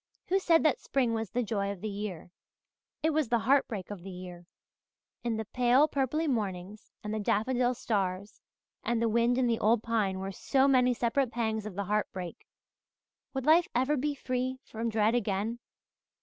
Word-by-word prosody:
Who 385 +2 +3
said 335 -3 +4
that 310 -5 +3
spring 250 -4 0
was 225 -2 -2
the 245 +4 -1
joy 200 -2 -1
of 195 -3 -8
the 215 - -3
year? 200 -4 -5 0.7
It 320 - +3
was 305 -5 0
the 235 - +3
heart 265 +5 +3
break 205 -5 -6
of 200 -4 -7
the 195 - -8
year. 180 -1 -9 0.8
And 230 -2 -1
the 220 - -3
pale 250 +6 +3
purply 285 +3 0
mornings 205 -5 -3
and 210 0 -4
the 215 - -1
daffodil 245 +4 +1
stars 200 -3 -2 0.4
and 235 -1 0
the 230 - +2
wind 235 +2 +2
in 260 - +2
the 235 -2 +1
old 220 +1 +3
pine 215 -5 0
were 190 +1 -4
so 265 +7 +2
many 250 -2 +4
separate 240 +3 +1
pangs 220 -3 -2
of 200 - -8
the 200 - -2
heart 210 +2 0
break. 180 -2 -7 0.9
Would 265 -1 -2
life 330 +3 +5
ever 260 +5 +2
be 290 +1 -1
free 255 -1 -2
from 230 +1 -3
dread 220 0 +2
again? 220 0 -1
230 Hz, 190 wpm, -30 LUFS, 205-255 Hz, 0.9 s, life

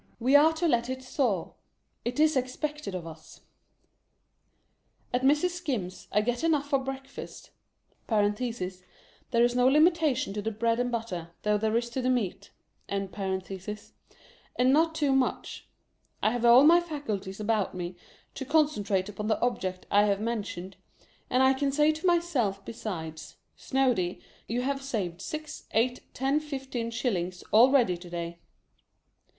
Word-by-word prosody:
We 255 +4 +3
are 305 +3 +7
to 330 +2 0
let 240 -4 +1
it 260 0 -4
soar. 245 - -1 0.5
It 245 +3 -3
is 310 0 +4
expected 270 -2 -3
of 175 -2 -5
us. 160 -1 -12 1.7
At 250 - +1
Mrs. 295 +7 +3
Skim's, 255 - -4
I 210 - +3
get 240 +4 -2
enough 300 -4 +2
for 275 - +4
breakfast 270 0 -8 0.6
(there 210 -3 +3 1.2
is 240 0 +2
no 250 0 +4
limitation 300 - +3
to 210 - -3
the 220 - -1
bread 230 +2 0
and 245 0 0
butter, 220 -8 -4
though 210 0 +2
there 220 +1 +1
is 235 0 -1
to 260 - -2
the 255 - 0
meat), 200 -6 -1 0.4
and 195 -1 -2 1.5
not 305 +6 +4
too 295 -3 +1
much. 265 -1 -1 0.6
I 215 - +4
have 240 0 -1
all 240 +3 +8
my 335 +3 +7
faculties 220 - -5
about 210 -3 0
me, 180 0 -5 0.4
to 275 - -5
concentrate 255 -10 +1
upon 210 +1 -5
the 215 - +1
object 185 -7 -2
I 205 +1 +5
have 200 -1 +1
mentioned, 205 -5 -4 0.5
and 265 +1 +4
can 275 +1 0
say 300 +2 +4
to 315 +4 -3
myself 280 - +1
besides, 180 -9 -6
" - - -47
Snoady, 245 -10 0 0.3
you 240 +3 -1
have 275 +1 -1
saved 195 -10 -3
six, 310 +7 -6
eight, 245 +3 +1
ten, 270 +3 +1
fifteen, 265 -6 -4
shillings, 185 -7 -2
already 235 -5 +5
to 175 0 -11
day. 170 0 -5
245 Hz, 145 wpm, -28 LUFS, 200-275 Hz, 1.7 s, all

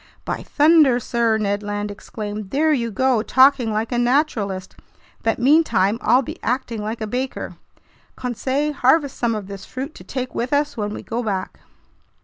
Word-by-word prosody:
"By - - -3
thunder, 300 -5 +4
sir!" 235 -2 +1
Ned 205 -1 -1
Land 205 0 -3
exclaimed. 210 0 -6
"There 310 +6 +2
you 235 -5 0
go, 250 +2 +2
talking 260 -1 +4
like 215 +3 -2
a 240 - 0
naturalist, 240 -8 0 0.5
but 225 - 0
meantime 240 - +3
I'll 255 +2 +4
be - - -8
acting 240 -3 -2
like 220 +2 -4
a - - -1
baker! 255 +5 -4 0.6
Conseil, 265 +4 -2
harvest 280 +1 +2
some 235 -2 0
of 210 -2 -5
this 195 0 -8
fruit 270 +4 -6
to - - -13
take 255 -1 -5
with 245 +4 -2
us 290 +1 +1
when 210 -3 -3
we - - -8
go 235 +1 -3
back." 195 -5 -3
240 Hz, 170 wpm, -21 LUFS, 210-265 Hz, 0.6 s, thunder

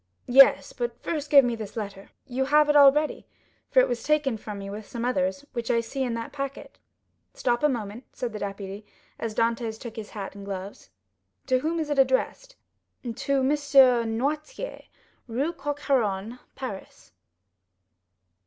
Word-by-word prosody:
"Yes; 270 - +6
but 485 -1 -4
first 300 -3 -3
give 280 -3 +7
me 240 -1 0
this 220 -1 -8
letter." 200 -2 -6 0.2
"You 265 +1 -1
have 300 +2 +4
it 295 - +3
already, 290 +1 +5 0.4
for - - +6
it - - +2
was 240 -1 -2
taken 300 -5 +1
from 210 -1 -7
me 195 0 -7
with 205 +1 -7
some 235 -1 -4
others 280 +2 -1
which 235 -1 -4
I 235 - +3
see 230 +4 -4
in 245 -3 -1
that 230 0 -5
packet." 275 -1 -6 0.6
"Stop 240 -1 0
a 300 - +4
moment," 230 -1 -4
said 240 -3 -5
the 210 - -5
deputy, 200 0 -6 0.4
as 225 -2 -4
Dantès 230 -1 0
took 235 -1 -9
his 215 -2 -6
hat 200 -3 -6
and 200 0 -10
gloves. 195 - -7 0.6
"To 255 0 +2
whom 325 +5 -1
is 305 -2 -2
it 285 - +1
addressed?" 270 - +1 0.5
_"To 265 +3 -1
Monsieur 270 -4 +5
Noirtier, 295 - -3 0.4
Rue 270 +8 -1
Coq 290 -2 -4
Héron, 230 -4 0 0.2
Paris." 230 -8 -8
250 Hz, 165 wpm, -26 LUFS, 220-285 Hz, 0.6 s, give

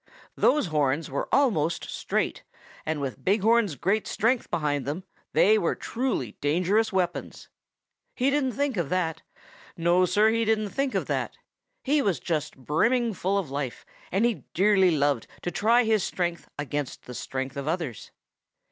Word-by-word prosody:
Those 295 0 +3
horns 150 -2 0
were 140 - -2
almost 175 - +2
straight, - - -2 0.4
and 155 -1 -1
with 135 -3 -5
Big 200 +2 +2
Horn's 225 -7 +3
great 200 +8 0
strength 230 +3 +1
behind 145 -3 0
them, 155 +6 -3 0.3
they 215 +2 +5
were 170 - 0
truly 230 - -2
dangerous 185 +9 +2
weapons. 180 -3 -2 0.7
He 265 +2 +2
didn't 275 -3 +1
think 280 -1 -1
of 170 -5 -1
that. 165 -3 -1 0.6
No, 175 +2 +3
Sir, 210 +4 +4
he 230 0 +1
didn't 215 -1 +1
think 275 +4 -1
of - - 0
that. - - -2 0.5
He 290 +2 +2
was 200 - 0
just 155 -4 -2
brimming 225 - +1
full 195 +1 0
of 175 -9 -3
life, 140 -3 -4 0.3
and 195 +6 +2
he 240 -3 -1
dearly 195 0 +5
loved 145 -6 +1 0.2
to 175 - -2
try 230 +7 +3
his 220 -4 +2
strength 175 -2 -2
against 145 -1 -4
the 125 - -8
strength 130 +1 -4
of 140 0 -4
others. 160 - -3
185 Hz, 160 wpm, -26 LUFS, 150-220 Hz, 0.7 s, they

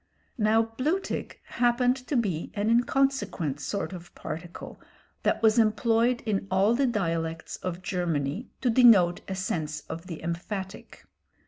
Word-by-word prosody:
Now 220 +1 +4 0.2
"blutig" 330 +9 -1
happened 245 +1 +2
to 290 - -1
be 185 -9 -1
an 210 +2 +1
inconsequent 235 - +1
sort 190 +7 -3
of 175 -1 -10
particle 165 +3 -8 0.4
that - - 0
was 220 +1 +5
employed 230 +2 +2
in 195 -3 -1
all 195 +4 +3
the 265 +2 +2
dialects 165 -7 -2
of 180 0 -5
Germany 175 - -2
to 250 - +2
denote 220 -8 +6
a 190 - -3
sense 155 -5 -3
of 165 +3 -8
the 165 -4 -7
emphatic. 190 +3 -5
200 Hz, 135 wpm, -27 LUFS, 170-235 Hz, 0.4 s, denote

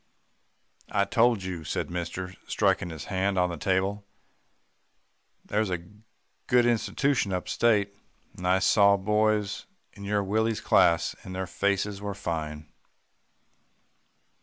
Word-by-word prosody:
"'I 100 - +1
told 115 0 +2
you,' 90 -3 -5
said 80 - -3
mister 90 +1 -4
striking 90 - +1
his 80 -2 -7
hand 95 0 -1
on 90 -1 +2
the - - -4
table, 95 +4 0 1.4
'that - - -16
there's 105 -1 +1
a 90 -2 -3 0.6
good 125 -1 +4
institution 120 0 +1
up 90 -1 -2
state, 105 -4 +2 0.4
and 90 - -4
I 90 +1 +4
saw 100 +1 +4
boys 105 0 0 0.3
in 100 - -11
your 100 0 0
Willie's 110 +3 0
class, 85 -1 +3
and 95 - -8
their 95 0 -2
faces 100 +2 -1
were 100 -1 -4
fine. 80 -5 -4
100 Hz, 130 wpm, -27 LUFS, 90-105 Hz, 1.4 s, good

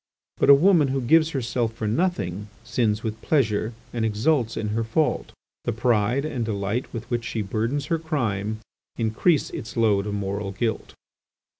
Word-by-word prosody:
But - - +2
a 140 - +11
woman 165 -1 +5
who 135 0 0
gives 155 +6 +4
herself 120 -5 -1
for 110 -1 -3
nothing 105 - -1 0.2
sins 115 -3 0
with 110 -1 -4
pleasure 110 -7 +1 0.2
and 115 -2 -1
exults 115 +2 +1
in 105 - -2
her 115 +2 0
fault. 145 +8 0 0.3
The - - +1
pride 120 +3 +1
and 130 -6 -2
delight 105 +2 -2
with 115 -1 -6
which 120 -1 0
she 115 -2 -3
burdens 115 +8 -1
her 165 +1 0
crime 110 - -2 0.4
increase 120 +8 +1
its 115 +2 -7
load 105 -3 +2
of 105 - -2
moral 100 0 -3
guilt. 110 +2 -3
115 Hz, 165 wpm, -24 LUFS, 105-135 Hz, 0.4 s, a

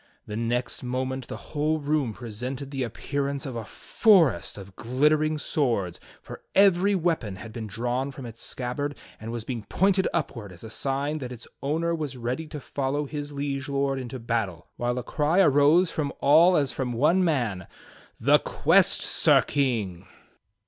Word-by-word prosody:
The 105 - -6
next 120 +3 -2
moment 130 +1 -3
the - - -6 0.2
whole 155 +1 +1
room 145 -4 0
presented 125 +6 -6
the 135 -2 -3
appearance 140 +4 -3
of 130 -3 -5
a 115 - -4
forest 160 - +2
of 100 -1 -11
glittering 150 +5 +2
swords, 115 - -1 0.2
for - - -9
every 195 0 +5
weapon 160 - 0
had 110 +3 -10
been 110 -2 -5
drawn 120 +5 -2
from 135 -2 -8
its 115 -1 -8
seabbard 145 +3 -3 0.2
and 110 +1 -6
was 120 -1 -4
being 120 -1 -4
pointed 190 - +2
upward 120 - -3
as 85 - -12
a 110 - -8
sign 140 +5 -2
that 125 -3 -6
its 125 -1 -9
owner 160 +5 0
was 150 -6 -4
ready 125 +6 -3
to 150 -1 -7
follow 140 +2 -2
his 145 0 -5
Liege 140 -1 -3
Lord 140 -1 0
into 130 0 -6
battle, 115 -8 -3
while 120 +1 -1
a 125 - -2
cry 155 +8 +1
arose 155 +1 +5
from 145 -3 -2
all 165 +6 +6
as 140 -3 +1
from 125 -2 -2
one 155 +10 +3
man, 120 - 0 0.5
"The - - +5
quest. - - +3
Sir - - +4
King!" 105 -10 -1
135 Hz, 170 wpm, -26 LUFS, 120-150 Hz, 0.5 s, all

